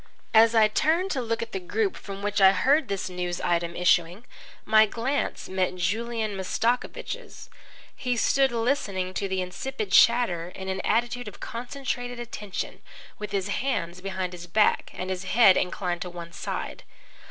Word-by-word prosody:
As 225 +1 +6
I 220 -1 +6
turned 325 - +1
to 270 - -1
look 230 -1 -2
at 230 - -9
the 190 - -3
group 390 - -1
from 195 0 -8
which 205 0 0
I 190 0 +8
heard 275 +11 +3
this 195 -2 -2
news 180 -1 -3
item 170 0 0
issuing, 180 +4 +2 0.4
my 220 0 +6
glance 250 +7 -2
met 185 -1 -1
Julian 220 +4 -1
Mastakovich's. 235 - -3 0.4
He 250 -1 -2
stood 270 +3 +3
listening 225 -6 -1
to 195 - -2
the 190 -1 -1
insipid 215 +3 -5
chatter 195 -8 +4
in 190 0 -6
an 190 0 -2
attitude 240 +2 0
of - - -9
concentrated 245 0 -5
attention, 210 -5 -6 0.4
with 210 -2 -5
his 200 -1 -1
hands 180 -8 -2
behind 185 -1 -3
his 175 0 -9
back 210 +5 +2
and 185 +1 -4
his 185 0 -4
head 195 -1 +6
inclined 180 -1 -1
to 180 - -4
one 170 -1 -9
side. - - -5
205 Hz, 165 wpm, -26 LUFS, 185-240 Hz, 0.4 s, I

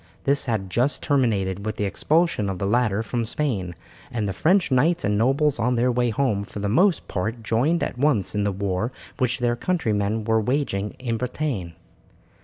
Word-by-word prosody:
This 140 0 +1
had 100 -5 -2
just 125 +8 +1
terminated 100 -9 +1
with 110 0 -3
the - - -2
expulsion 150 - +1
of 95 - -3
the 100 - -2
latter 110 0 +1
from 115 +2 -2
Spain, 110 - -2 0.3
and 110 -4 -2
the 95 - -2
French 180 - +2
knights 165 +7 +2
and 105 - +1
nobles 135 +6 +2
on 125 +3 +1
their 125 +2 +2
way 120 0 +1
home 110 -3 0
for 100 - -10
the 100 0 -2
most 175 - +2
part 110 +5 -3
joined 135 +10 +1
at 125 - -4
once 125 - +2
in 105 -1 0
the 100 - +1
war 100 +3 -2 0.3
which 125 -2 +1
their 120 -2 +1
countrymen 110 - 0
were 110 0 +2
waging 105 -5 -1
in 120 -3 -2
Bretagne. 125 - -3
115 Hz, 190 wpm, -24 LUFS, 100-135 Hz, 0.3 s, French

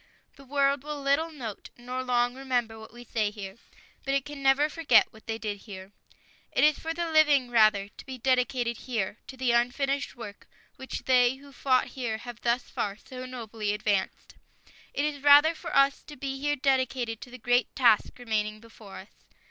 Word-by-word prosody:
The 275 - -15
world 280 0 +1
will 300 0 -5
little 280 +4 +1
note, 245 -10 -8
nor 250 +1 -5
long 245 -1 +1
remember, 245 -4 -2
what 220 - -12
we 240 +1 -12
say 220 -3 -1
here, 200 -1 -9 0.5
but 275 0 0
it 275 - 0
can 290 -1 -8
never 270 +2 +4
forget 305 -7 +3
what 220 -1 -18
they 225 0 -2
did 210 -2 -4
here. 190 0 -9 0.6
It - - +2
is 300 0 +4
for 325 - -6
us 325 - -2
the 340 -1 -2
living, 295 -5 +4
rather, 215 -4 +4
to - - -14
be 260 -1 -6
dedicated 250 -1 0
here 220 -4 -3
to 265 - -10
the 255 -2 +1
unfinished 275 +4 0
work 210 -4 -10 0.3
which 265 - -7
they 250 -1 +4
who 280 +1 -15
fought 255 -1 +1
here 240 -4 -3
have 240 0 -10
thus 240 +1 +1
far 200 0 -4
so 255 +3 -9
nobly 225 -4 -4
advanced. 205 -2 -2 0.6
It 285 - -1
is 290 -2 -3
rather 290 +3 +7
for 315 - -7
us 275 0 +4
to 295 - -10
be 270 0 -5
here 290 +1 0
dedicated 260 -4 0
to - - -9
the 250 - -10
great 245 0 +1
task 235 -4 +3
remaining 215 -3 -2
before 220 -4 -12
us. 190 - -16
250 Hz, 195 wpm, -28 LUFS, 225-275 Hz, 0.6 s, rather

